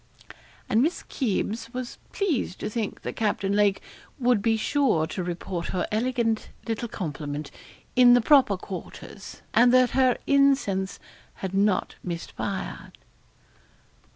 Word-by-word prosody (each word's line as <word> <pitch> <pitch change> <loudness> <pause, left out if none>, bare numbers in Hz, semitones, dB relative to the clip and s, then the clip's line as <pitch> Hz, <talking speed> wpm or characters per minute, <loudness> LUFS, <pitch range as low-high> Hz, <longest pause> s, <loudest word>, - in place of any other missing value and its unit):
And 220 - +3
Miss 320 +6 0
Kybes 230 -1 -2
was 255 -1 -5
pleased 320 - -1
to - - -3
think 220 -2 -4
that - - -4
Captain 200 -2 0
Lake 205 -1 +2 0.3
would 245 -4 +2
be 225 +1 +2
sure 235 - +2
to 180 +3 -4
report 175 0 -4
her 180 - -1
elegant 230 0 0 0.2
little 230 +1 -2
compliment 150 - -5 0.4
in 245 -1 +8
the 245 - +4
proper 260 -6 +5
quarters, 185 0 -9
and 245 +1 +6
that 255 -1 +5
her 260 -2 +3
incense 270 -9 +2 0.4
had 190 -1 -5
not 195 -1 +1
missed 170 -2 -5
fire. 195 -1 -5
220 Hz, 130 wpm, -26 LUFS, 190-250 Hz, 0.4 s, in